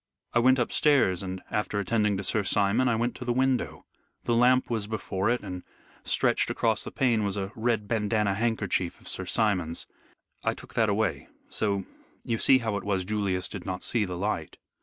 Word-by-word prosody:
I 120 - +4
went 130 +2 +5
upstairs, 120 - +3
and 95 -1 -5
after 105 -1 -1
attending 105 0 +1
to 100 - -4
Sir 110 +3 +2
Simon, 100 +5 +2
I 115 - +2
went 120 +2 0
to - - -6
the 120 - -1
window. 130 0 0 0.4
The 120 - 0
lamp 125 +2 +4
was 110 -4 -2
before 105 -2 -2
it, 120 0 +1
and 90 -3 -6 0.4
stretched - - +1
across - - 0
the - - -6
pane 120 -5 +1
was 100 0 -1
a 95 0 -3
red 115 -2 0
bandanna 105 -2 +1
handkerchief 100 -5 -1
of - - -15
Sir 95 - -2
Simon's. 90 -5 0 0.6
I - - 0
took - - -13
that 110 -2 +2
away, 105 0 0 0.2
so 100 -3 -1 0.4
you 115 -1 -1
see 130 - +6
how 110 -5 -2
it 100 - -6
was 95 -3 -1
Julius 100 -3 -1
did 95 - -7
not 95 0 -4
see 115 -3 +2
the 90 -3 -4
light." 85 -5 -3
105 Hz, 195 wpm, -27 LUFS, 95-115 Hz, 0.6 s, see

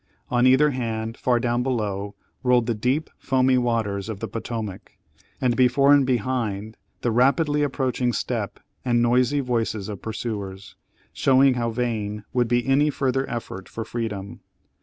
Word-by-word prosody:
On 120 +1 +4
either 140 +3 +5
hand, 115 -3 -3
far 120 -1 +1
down 120 0 0
below, 105 -5 -2 0.3
rolled 125 -2 +3
the 120 - 0
deep 125 +8 -1
foamy 130 -1 +2
waters 110 -4 -1
of 105 -3 -5
the 115 - -4
Potomac, 110 -2 -6 0.4
and 125 -2 +1
before 130 +3 +5
and 140 -2 +4
behind 110 -4 -1 0.3
the 120 - 0
rapidly 140 +5 +3
approaching 130 -3 0
step - - -3 0.2
and 120 -2 +2
noisy 125 +4 +3
voices 115 -5 -2
of 100 -3 -6
pursuers, 100 -4 -5 0.4
showing 135 0 +4
how 120 -1 -1
vain 110 -3 -2
would 125 -2 +2
be 120 +1 +1
any 140 +3 +3
further 135 -2 -1
effort 95 -5 -6
for 115 - -5
freedom. 105 -4 -5
120 Hz, 150 wpm, -24 LUFS, 110-130 Hz, 0.4 s, either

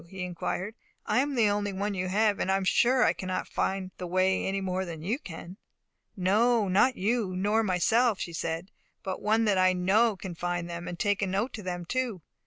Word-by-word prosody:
he 190 0 -6
inquired. 180 +3 -3 0.3
"I - - +2
am 280 +1 0
the 230 -3 +4
only 205 0 -1
one 200 +2 -2
you 185 -1 -2
have; 210 +2 +2
and 190 - 0
I 195 - +3
am 195 - -2
sure 245 +7 +3
I - - +4
cannot 185 0 -4
find 190 -1 -2
the 180 - -4
way 185 +2 +1
any 195 +1 -1
more 190 -1 -2
than 165 -4 -7
you 220 - -1
can." 180 - -9 0.6
"No, 215 +4 +3
not 210 +8 +3
you, 205 -1 0
nor 205 +4 +2
myself," 220 +3 +2
she 170 - -5
said; 165 +3 -4 0.3
"but 190 -3 -4
one 220 +2 +2
that 200 -3 +2
I 185 0 +4
know 200 +5 +3
can 185 -1 -7
find 175 0 -3
them, 170 0 -6
and 175 - -5
can - - -1
take 205 -1 +1
a 195 - +1
note 200 +7 -1
to 215 - -6
them 175 -2 -4
too." 240 -5 -2
190 Hz, 220 wpm, -28 LUFS, 180-215 Hz, 0.6 s, the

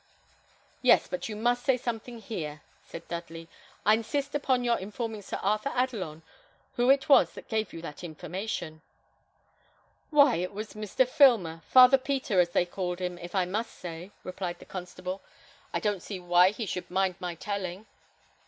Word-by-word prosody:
"Yes; - - +5
but 275 - -4
you 215 - -4
must 240 +3 +1
say 265 -2 +3
something 240 0 -5
here," 160 -9 -6 0.2
said 165 - -10
Dudley. 165 -1 -6 0.4
"I 210 - +6
insist 275 +6 -1
upon 265 -4 +1
your 235 -1 +2
informing 215 +2 -5
Sir 200 - -5
Arthur 215 +6 +1
Adelon, 195 -12 -2 0.5
who 245 +1 +2
it 270 0 +4
was 275 -3 +6
that - - -11
gave 220 -3 -1
you 165 - -9
that 150 +1 -8
information." 170 0 -5 1.3
"Why, 285 - +5
it 180 +3 -3
was 210 +1 -6
Mr. 215 +4 0
Filmer; 225 - +4
Father 255 +1 +8
Peter, 260 -7 0
as 175 -1 +4
they 175 - +2
call 180 0 -3
him, 180 -1 -4
if 175 +2 -8
I 185 -2 +3
must 215 +6 -3
say," 175 +1 -8
replied 180 -1 -4
the - - -14
constable. 185 +1 -6 0.5
"I - - -1
don't 205 -3 -1
see 195 0 -6
why 175 +1 +5
he 215 +3 -4
should 180 -2 -4
mind 190 0 0
my 175 -1 -4
telling." 195 +1 -4
200 Hz, 170 wpm, -28 LUFS, 175-240 Hz, 1.3 s, Father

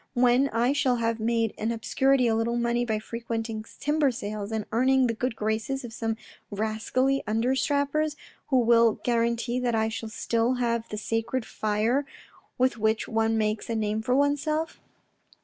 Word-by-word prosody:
When 250 +2 +4
I 240 +4 +1
shall 270 -3 +2
have 230 -1 -1
made 225 0 +1
in 220 +2 0
obscurity 265 +3 +2
a 230 - +3
little 230 +2 0
money 240 0 +1
by 220 -2 0
frequenting 225 0 -4 0.2
timber 295 -1 +2
sales, 210 -3 -5
and 220 -2 -2
earning 260 +3 +3
the 235 - +1
good 245 +1 -2
graces 220 +6 -2
of 230 - -9
some 225 0 -2 0.3
rascally 220 +6 0
under 225 +4 +1
strappers 290 +2 0 0.3
who 265 - +2
will 230 -1 +5
guarantee 235 +1 0
that 245 -2 0
I 220 0 +1
shall 225 0 -5
still 230 +3 0
have 235 -2 -1
the 210 - -5
sacred 225 +3 -2
fire 220 +6 0 0.5
with 255 -2 +1
which 220 +1 +1
one 225 0 +1
makes 215 0 -1
a 230 - -1
name 215 0 -1
for 250 +3 +1
oneself? 290 +3 0
230 Hz, 165 wpm, -27 LUFS, 220-255 Hz, 0.5 s, will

